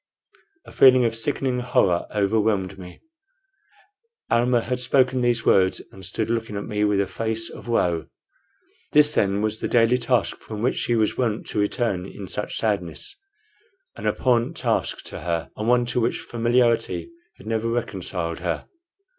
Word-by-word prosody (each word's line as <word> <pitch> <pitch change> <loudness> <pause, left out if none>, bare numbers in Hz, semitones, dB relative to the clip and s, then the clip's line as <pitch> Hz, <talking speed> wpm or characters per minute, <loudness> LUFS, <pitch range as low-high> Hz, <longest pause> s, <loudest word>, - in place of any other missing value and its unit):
A - - -13
feeling 130 -2 +6
of 115 - +1
sickening 130 +1 -1
horror 100 -8 +1
overwhelmed 100 -2 0
me. 90 -1 -11 1.3
Almah 120 0 +3
had 125 +1 -2
spoken 130 0 +2
these 120 -1 +1
words 95 -1 +4
and 95 - -13
stood 105 +4 -2
looking 115 -2 -2
at 100 - -4
me 105 -1 -1
with 105 -1 +2
a 100 - +2
face 110 +3 -3
of - - -11
woe. 90 -8 0 0.9
This, 150 0 +6
then, 100 -3 +1
was 110 0 -1
that - - -2
daily 120 +1 +3
task 120 -7 0
from 110 0 -7
which 130 - +1
she 120 - 0
was 110 +1 0
wont 115 -3 0
to - - -2
return 105 -3 -1
in 100 -1 -9
such 105 - -4
sadness 100 - -2 0.8
an - - -4
abhorrent 120 -2 +1
task - - -1
to - - -8
her, 85 -1 -3
and 105 - -4
one 120 0 +4
to 120 +1 -1
which 115 - 0
familiarity 120 - +1 0.3
had - - -15
never 115 +1 -1
reconciled 95 -7 -3
her. 90 0 -3
115 Hz, 165 wpm, -23 LUFS, 100-120 Hz, 1.3 s, feeling